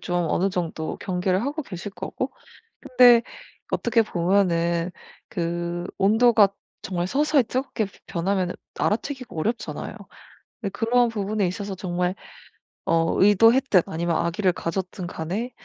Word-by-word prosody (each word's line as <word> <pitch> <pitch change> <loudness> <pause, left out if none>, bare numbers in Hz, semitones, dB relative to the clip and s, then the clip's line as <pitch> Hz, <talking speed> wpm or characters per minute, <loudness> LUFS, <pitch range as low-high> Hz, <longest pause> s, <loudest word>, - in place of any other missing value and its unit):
좀 175 -1 -1
어느 195 +2 +1
정도 165 -3 -3
경계를 185 0 0
하고 295 +3 -3
계실 195 -4 -7
거고 - - -4 0.5
근데 250 -3 +6 0.5
어떻게 230 - +2
보면은 170 -3 +1 0.4
그 170 0 -3 0.2
온도가 220 +1 +5 0.3
정말 180 -1 -2
서서히 290 +2 +3
뜨겁게 245 -1 -2 0.2
변하면은 185 +1 -1 0.2
알아채기가 255 +2 -2
어렵잖아요. 225 +9 -3 0.7
근데 200 - -2
그런 235 +3 +2
부분에 210 -2 -1
있어서 195 +3 -4
정말 180 -1 -2 0.7
어 165 0 +1
의도했든 220 +1 +5
아니면 170 +1 -1
악의를 180 +2 +1
가졌든 180 +1 -4
간에 185 +10 -4
195 Hz, 290 characters per minute, -24 LUFS, 175-225 Hz, 0.7 s, 근데